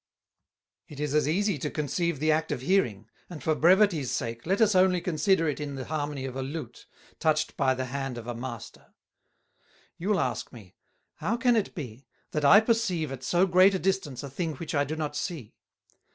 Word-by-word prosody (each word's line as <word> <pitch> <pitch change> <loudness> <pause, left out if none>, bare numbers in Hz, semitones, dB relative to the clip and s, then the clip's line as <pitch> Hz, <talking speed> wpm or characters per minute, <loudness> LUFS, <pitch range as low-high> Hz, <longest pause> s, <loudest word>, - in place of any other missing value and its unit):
"It 145 - -11
is 150 -1 -2
as 150 -1 +2
easie 190 +1 +1
to - - -2
conceive 155 +1 -2
the 155 +2 +2
Act 160 +1 0
of - - -2
Hearing, 120 - +1 0.2
and 170 -4 -9
for 160 - +2
Brevities 175 - +4
sake, 115 +1 -4
let 195 +3 +1
us 215 -2 +4
only 185 -1 +4
consider 165 +1 +1
it 150 - -2
in 145 -2 -5
the 130 -1 -5
Harmony 145 -3 -3
of 130 -1 -6
a 135 - -3
Lute, 145 +4 -7 0.3
touched 155 0 +1
by 130 -1 +2
the 130 0 -3
Hand 135 -1 -4
of 115 - -7
a 120 - -4
Master. 120 -1 -9 1.0
You'll 195 +3 +1
ask 125 -3 -2
me, 105 -7 -14 0.4
How 190 +10 -1
can 245 -1 +3
it 215 -3 -1
be, 130 - -8 0.2
that 150 - -2
I 200 +9 +8
perceive 220 - 0
at 135 -2 -6
so 175 +9 +3
great 185 +1 +5
a - - +2
distance 190 -9 -2
a 140 - -6
thing 160 +1 -3
which 160 +4 -6
I 145 -1 +2
do 155 +3 -4
not 150 -2 -3
see? 145 - -5
155 Hz, 200 wpm, -27 LUFS, 135-185 Hz, 1.0 s, I